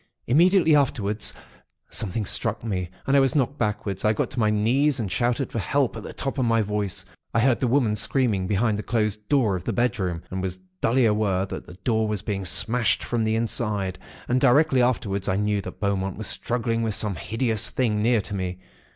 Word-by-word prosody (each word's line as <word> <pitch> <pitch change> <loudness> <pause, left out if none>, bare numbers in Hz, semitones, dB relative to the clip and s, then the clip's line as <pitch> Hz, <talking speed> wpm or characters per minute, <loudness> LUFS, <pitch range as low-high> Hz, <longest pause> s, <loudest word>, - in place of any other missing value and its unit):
Immediately 165 +4 +4
afterwards, 110 -7 +1 0.6
Something 110 0 -2
struck 110 +2 -2
me, 90 -6 -2 0.2
and 140 - +2
I - - +7
was 135 +2 +2
knocked 140 0 0
backwards. 105 -3 -2
I 105 - +3
got - - 0
on - - -6
to 130 - -5
my 110 -2 +3
knees, 125 +7 +2
and 105 -5 -3
shouted 125 +2 0
for 115 - -2
help, 135 +3 0
at 110 - -6
the - - -8
top 135 0 -4
of 130 - +2
my 115 -1 +3
voice. 105 -2 -2 0.3
I - - +4
heard 125 +1 +3
the 130 - +1
women 120 -4 +2
screaming 105 -6 +1
behind 105 +1 +1
the - - -1
closed 105 -2 -1
door 125 -9 +3
of 90 - -5
the - - -1
bedroom, 95 -8 -1
and 95 0 -3
was 95 -1 -3 0.2
dully 125 +2 +3
aware 105 -3 +1
that - - -7
the 90 - -11
door 110 -2 +1
was 105 -2 -2
being 100 -3 -3
smashed 110 +6 +1
from 120 -2 -1
the 110 0 +1
inside; 105 -4 -1 0.3
and 125 +1 +1
directly 135 0 +4
afterwards 100 -6 0
I 95 - +1
knew 105 0 0
that - - -9
Beaumont 95 -2 -1
was 110 - -3
struggling 115 0 -1
with 110 -2 -1
some 105 -1 -1
hideous 110 +4 -1
thing, 110 -5 0
near 115 0 +3
to 105 - -8
me. 90 -2 -3
110 Hz, 210 wpm, -24 LUFS, 100-125 Hz, 0.6 s, I